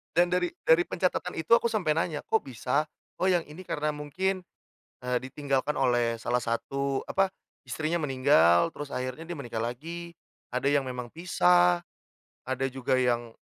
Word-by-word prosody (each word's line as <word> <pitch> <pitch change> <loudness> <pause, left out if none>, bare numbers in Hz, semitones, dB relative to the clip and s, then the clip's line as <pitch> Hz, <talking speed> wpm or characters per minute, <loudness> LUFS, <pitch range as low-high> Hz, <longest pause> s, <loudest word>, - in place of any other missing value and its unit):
Dan 175 +1 +4
dari 180 -1 +2 0.2
dari 165 +2 +6
pencatatan 180 0 -1
itu 160 +8 +2
aku 235 0 +5
sampai 185 -9 +1
nanya, 160 -2 -1
"Kok 225 - +2
bisa?" 135 +3 -1 0.3
Oh, 185 - +2
yang 175 -2 +3
ini 155 +5 -11
karena 150 -2 -1
mungkin, 185 +6 -2 0.6
eee, 125 0 +1
ditinggalkan 140 +1 -1
oleh 120 -3 +2
salah 120 +2 0
satu, 135 +4 -1
apa? 195 0 +2 0.3
Istrinya 160 +2 -2
meninggal, 130 - +4
terus 145 -1 -6
akhirnya 130 +4 -4
dia 175 - -4
menikah 120 -5 -4
lagi, 165 +9 -5 0.4
ada 125 +2 -2
yang 145 0 +3
memang 125 -2 -5
pisah, 90 - +4 0.7
ada 130 +1 -1
juga 130 0 0
yang, 120 -2 0
140 Hz, 155 wpm, -28 LUFS, 125-170 Hz, 0.7 s, dari